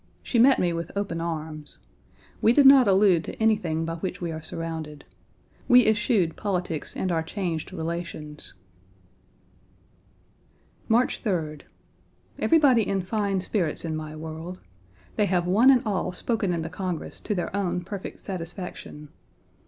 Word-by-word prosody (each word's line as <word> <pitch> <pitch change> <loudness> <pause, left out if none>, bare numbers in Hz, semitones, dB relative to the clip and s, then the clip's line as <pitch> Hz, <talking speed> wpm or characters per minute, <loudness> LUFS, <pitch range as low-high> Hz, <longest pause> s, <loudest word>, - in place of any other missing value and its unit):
She 240 - 0
met 260 +3 +6
me 175 -1 +1
with 170 0 -4
open 195 -5 -2
arms. 155 -2 -5 0.6
We 225 - +5
did 280 +1 +5
not 270 -3 +8
allude 190 -4 +4
to - - -6
anything 205 -8 +1
by 165 0 -4
which 185 +3 -4
we 170 -2 -3
are 160 0 -6
surrounded. 160 -3 -6 0.6
We 250 -2 +7
eschewed 210 -5 +2
politics 180 -6 -3
and 185 - -1
our 165 -1 +1
changed 165 -1 -4
relations. 160 - -5 2.3
March 235 +3 +2
3d. 160 - -2 0.7
Everybody 285 -8 +5
in 195 -2 0
fine 200 -1 -1
spirits 180 -5 -1
in 160 -1 -2
my 155 0 -6
world. 160 +3 -7 0.6
They 210 -2 +3
have 180 -2 +1
one 210 +9 +5
and 255 -3 +5
all 195 -3 -1
spoken 205 +1 -1
in 170 -2 -1
the 165 - -5
Congress 180 -2 -4
1 - - -26
to 210 - 0
their 180 +1 -3
own 180 -3 -1
perfect 195 +2 -7
satisfaction. 175 -4 -7
180 Hz, 145 wpm, -26 LUFS, 160-210 Hz, 2.3 s, not